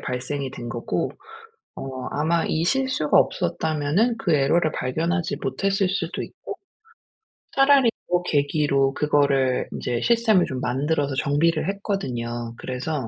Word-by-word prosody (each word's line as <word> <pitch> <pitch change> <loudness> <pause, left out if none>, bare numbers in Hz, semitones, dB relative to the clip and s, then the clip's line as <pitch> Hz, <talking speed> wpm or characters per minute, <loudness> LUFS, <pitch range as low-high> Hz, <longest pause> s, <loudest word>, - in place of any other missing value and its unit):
발생이 130 +2 -3
된 120 - -7
거고 120 0 -2 0.7
어 130 -1 -6
아마 160 +3 +1
이 160 - 0
실수가 260 - +2
없었다면은 165 +5 +1
그 170 - +1
에러를 155 +3 +2
발견하지 165 +7 -1
못했을 195 -1 0
수도 185 -2 -2
있고 - - -8 1.0
차라리 270 -3 +5 0.2
그 180 0 +3
계기로 140 -2 +2
그거를 140 -3 +2
인제 120 -1 -3
시스템을 225 -6 +3
좀 130 -4 -4
만들어서 140 +2 -1
정비를 155 +5 +1
했거든요. 120 - -3
그래서 130 +6 -4
150 Hz, 295 characters per minute, -23 LUFS, 135-180 Hz, 1.0 s, 차라리